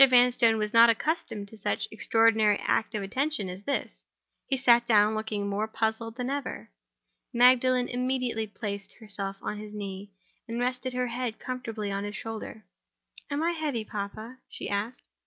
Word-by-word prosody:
Vanstone 245 -2 +5
was 210 +1 -2
not 230 0 +8
accustomed 230 -4 -1
to 220 - -13
such - - -1
an - - -18
extraordinary 220 -1 +3
act 225 - +1
of 205 - -2
attention 255 0 -1
as 180 +2 -7
this. 280 - -2 0.5
He 270 - +1
sat 240 -2 +5
down, 210 -1 +5
looking 215 -2 -2
more 205 +2 -1
puzzled 220 +1 -2
than 250 0 -3
ever. 280 - -4 0.6
Magdalen 250 +1 +5
immediately 250 -3 -1
placed 200 -1 -5
herself 200 -3 -6
on 210 - -3
his 210 0 -9
knee, 200 -1 -6 0.4
and 230 +1 -3
rested 250 +1 -1
her 250 0 0
head 240 -1 -3
comfortably 225 -5 -4
on 200 0 -2
his 205 +1 -5
shoulder. 220 -1 -6 0.6
"Am 290 +2 -1
I 340 - +2
heavy, 295 -9 -2
papa?" 215 +4 -6
she - - -6
asked. 215 +5 -3
225 Hz, 165 wpm, -28 LUFS, 210-250 Hz, 0.6 s, not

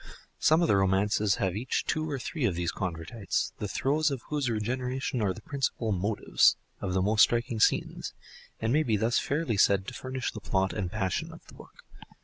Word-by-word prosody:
Some 160 +3 +4
of - - +2
the 100 - +4
romances 100 +1 +2
have 95 -2 -1
each 120 +5 -1
two 155 0 -1
or 140 - -2
three 130 +3 -3
of 95 -7 +1
these 85 0 -1
convertites, 95 +3 -3
the 105 - -2
throes 145 +9 +1
of 135 -4 -4
whose 145 -4 0
regeneration 125 +3 -2
are 100 -3 +2
the 105 +3 -8
principal 130 -5 -2
"motives" 100 +2 +2 0.2
of 95 -2 -3
the 95 - +2
most 105 +2 +3
striking 115 -1 +3
scenes, - - +1 0.4
and 115 +2 0
may 155 - +4
be 115 -8 +1
thus 115 +3 +2
fairly 140 -7 -1
said 95 0 +4
to - - -11
furnish 130 -1 -4
the 110 - -8
plot 95 -2 0
and 95 -4 -3
passion 95 -5 -2
of - - -14
the - - -15
book. - - -15
110 Hz, 200 wpm, -28 LUFS, 100-130 Hz, 0.4 s, Some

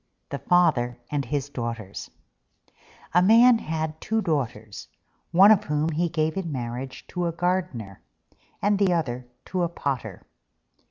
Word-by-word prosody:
THE - - -4
FATHER 145 -9 +2
AND 145 -2 -1
HIS 140 +2 -2
DAUGHTERS 115 -6 -5 1.0
A 180 - +5
Man 230 +5 +6
had 160 -2 -4
two 220 0 0
Daughters, 120 - -3 0.4
one 190 +5 +7
of 210 -1 +4
whom 150 +1 0
he 165 +2 0
gave 155 -1 0
in 185 -4 -3
marriage 125 0 -5
to 180 -1 -2
a - - -1
gardener, 165 - -2 0.6
and 205 0 +2
the 195 -3 +3
other 125 -7 -2 0.2
to 185 - -2
a 170 - +1
potter. 130 - -4
155 Hz, 145 wpm, -25 LUFS, 125-180 Hz, 1.0 s, one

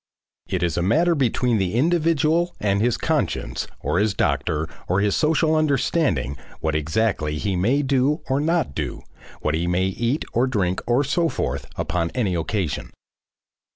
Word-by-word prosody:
It 90 -2 -1
is 85 -2 0
a - - +2
matter 160 - +3
between 125 -5 +1
the 95 +2 -1
individual 165 +3 +2
and 100 -1 +1
his 120 0 +2
conscience - - -1
or 90 - 0
his 105 -1 +1
doctor 75 +1 0 0.2
or 90 +2 +2
his 100 -1 +2
social 160 +1 +2
understanding 140 - +1 0.2
what 80 -1 -1
exactly 75 0 0
he 95 +4 -1
may 120 +11 +2
do 140 +3 +1
or 135 +1 +1
not 165 - 0
do, - - -4 0.4
what 75 - 0
he 85 +2 0
may 90 +1 +1
eat 115 - -1
or 125 +2 +2
drink 95 -7 0
or 120 +4 +3
so 165 +4 +1
forth, - - -3
upon 85 -1 -1
any 110 -8 0
occasion. 85 - -2
110 Hz, 160 wpm, -23 LUFS, 90-145 Hz, 0.4 s, matter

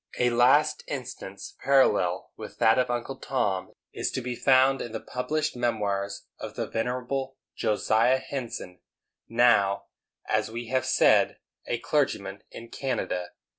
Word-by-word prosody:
A 125 0 +2
last 145 +6 +4
instance 125 -7 -7
parallel 100 -10 +3
with - - -9
that 110 +3 +4
of 125 - +1
Uncle 120 +2 -3
Tom 105 -10 -1 0.2
is - - -1
to 130 - -2
be 125 0 -3
found 135 +1 +4
in 115 - -6
the 110 - -3
published 150 +4 -2
memoirs 100 -5 -1
of - - -7
the - - -2
venerable 125 +3 -3 0.2
Josiah 110 +4 +2
Henson, 120 -9 -6 0.5
now, 110 -4 +3 0.4
as 110 0 +1
we 115 0 -6
have 130 0 0
said, - - +4 0.3
a 120 - 0
clergyman 110 -9 -1
in 115 0 -10
Canada. 95 -10 -2
120 Hz, 135 wpm, -27 LUFS, 105-130 Hz, 0.5 s, last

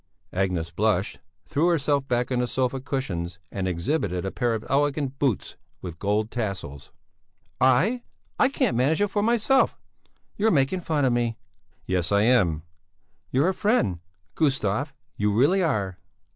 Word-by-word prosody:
Agnes 90 -3 -1
blushed, 100 +1 0 0.3
threw 155 +3 +1
herself 145 -5 +1
back 125 +1 0
on 125 - +1
the 125 - 0
sofa 130 +1 -1
cushions 95 -11 -3
and 95 -1 -2
exhibited 90 - -1
a 95 - -2
pair 120 -3 0
of 110 - -6
elegant 140 0 +1
little 135 -5 +4
boots - - -13 0.2
with 85 -2 -8
gold 105 +2 0
tassels. 90 - -5 0.7
"I? 165 - +3 0.4
I 270 - +5
can't 265 - 0
manage 135 +6 +2
it 205 0 +2
for 205 - +1
myself! 235 +4 +3 0.6
You're 215 +2 +3
making 145 +1 +2
fun 155 -4 0
of 125 - +3
me!" 120 -2 0 0.5
"Yes, 90 -1 -1
I 100 0 +4
am!" 95 -10 +3 0.7
"You're 140 +8 +2
a - - 0
friend, 185 - +1 0.3
Gustav, 135 -3 0 0.3
you 105 0 +1
really 145 - +3
are!" 100 - -1
125 Hz, 155 wpm, -25 LUFS, 100-150 Hz, 0.7 s, I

